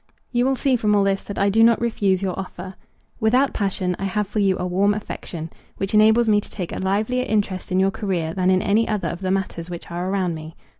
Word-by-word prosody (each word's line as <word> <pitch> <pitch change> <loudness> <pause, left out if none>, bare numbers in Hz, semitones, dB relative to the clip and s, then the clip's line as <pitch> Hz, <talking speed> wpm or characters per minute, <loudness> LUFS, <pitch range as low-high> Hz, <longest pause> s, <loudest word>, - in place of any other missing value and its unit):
You 245 0 +2
will 270 0 +2
see 265 0 +1
from 210 -3 +2
all 200 - +4
this 195 0 +1
that 200 - -6
I 200 0 +2
do 225 +3 +3
not 230 0 +5
refuse 200 -5 0
your 190 -2 -1
offer. 185 0 -7 0.5
Without 250 +5 +3
passion, 190 -3 -1
I 195 - -2
have 205 +2 -1
for 210 - -3
you 195 -2 +2
a 180 - -3
warm 195 +3 +2
affection, 170 -5 -6 0.3
which 195 +1 -3
enables 220 +2 +5
me 210 -1 +4
to - - -13
take 180 -4 -6
a - - -4
livelier 215 +7 0
interest 200 -4 -1
in 185 - +2
your 195 +1 +3
career 175 -6 -2
than 185 0 +1
in 185 0 +3
any 220 +3 +2
other 205 -6 -1
of 170 +4 -6
the 185 - -2
matters 185 -3 -2
which 175 -1 -8
are 175 +2 -3
around 190 -3 0
me. 160 +1 -8
195 Hz, 245 wpm, -22 LUFS, 185-215 Hz, 0.5 s, not